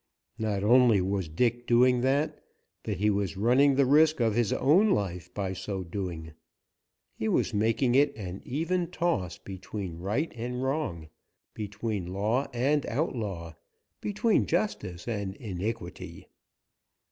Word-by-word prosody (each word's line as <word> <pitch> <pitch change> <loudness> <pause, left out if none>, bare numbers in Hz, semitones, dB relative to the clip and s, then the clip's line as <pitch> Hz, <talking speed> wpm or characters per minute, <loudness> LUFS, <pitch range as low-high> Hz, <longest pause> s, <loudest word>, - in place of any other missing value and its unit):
Not 105 -3 -1
only 120 -1 +5
was 95 -2 -1
Dick 120 +8 0
doing 125 +1 +4
that, 140 +4 0 0.4
but 105 - -3
he 105 +3 +2
was 100 -1 -1
running 130 +6 +4
the 140 0 +4
risk 155 +3 +4
of 115 -2 +2
his 115 -2 +1
own 180 +11 +4
life 90 - -1
by 95 -1 -3
so 95 0 -4
doing. 85 -3 -5 0.8
He 110 - -3
was 115 - +1
making 115 +4 +2
it 140 +2 +4
an 95 -3 -6
even 170 +6 -1
toss 165 - -1
between 95 -2 -7
right 105 - -1
and 125 +2 -4
wrong, 130 - -2 0.4
between 105 -2 -4
law 110 +8 0
and 140 +4 +1
outlaw, 105 - -3 0.5
between 210 +1 +1
justice 95 - -2
and 100 -4 -3
iniquity. 105 -1 -5
110 Hz, 135 wpm, -28 LUFS, 95-130 Hz, 0.8 s, only